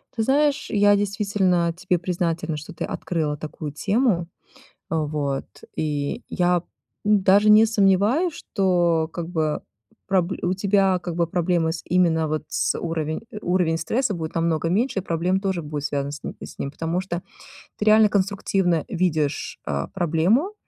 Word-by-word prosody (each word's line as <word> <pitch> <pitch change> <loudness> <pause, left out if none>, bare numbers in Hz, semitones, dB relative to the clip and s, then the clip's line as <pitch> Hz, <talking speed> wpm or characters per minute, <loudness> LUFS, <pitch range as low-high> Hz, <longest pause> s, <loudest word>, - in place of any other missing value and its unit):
Ты 225 - 0
знаешь, 285 +3 +2
я 205 -1 +4
действительно 200 -4 +1
тебе 180 0 0
признательна, 170 -2 -2
что 150 +1 -8
ты 160 - -5
открыла 155 -4 -2
такую 150 0 -6
тему, 200 - +1 0.6
вот, 150 -3 -1 0.3
и 145 -2 -2
я 180 -1 +1 0.4
даже 205 0 +4
не 215 +1 +7
сомневаюсь, 215 - +2
что 175 - +1
как 170 -1 -5
бы 160 -3 -1 0.4
проб 185 -2 +1
у 180 +1 +1
тебя, 195 -1 +2
как 175 -1 -5
бы, 170 -1 +2
проблемы 170 -1 0
с 160 - -6
именно 165 -3 +2
вот 155 0 -2
с - - 0
уровень 160 -2 -2 0.2
уровень 175 -2 +1
стресса 215 +8 -1
будет 160 -2 -5
намного 165 -1 0
меньше, 210 +2 +1
и - - -10
проблем 180 +1 0
тоже 190 -3 -1
будет 150 -1 -5
связан 140 -1 -2
с 145 - -8
ним, 140 - -3
потому 165 +4 -2
что 175 -2 -4 0.6
ты 210 - -2
реально 215 0 +6
конструктивно 195 -4 +1
видишь, 155 -5 -1
а, 70 -1 -2
проблему, 185 - +1
175 Hz, 150 wpm, -23 LUFS, 160-200 Hz, 0.6 s, не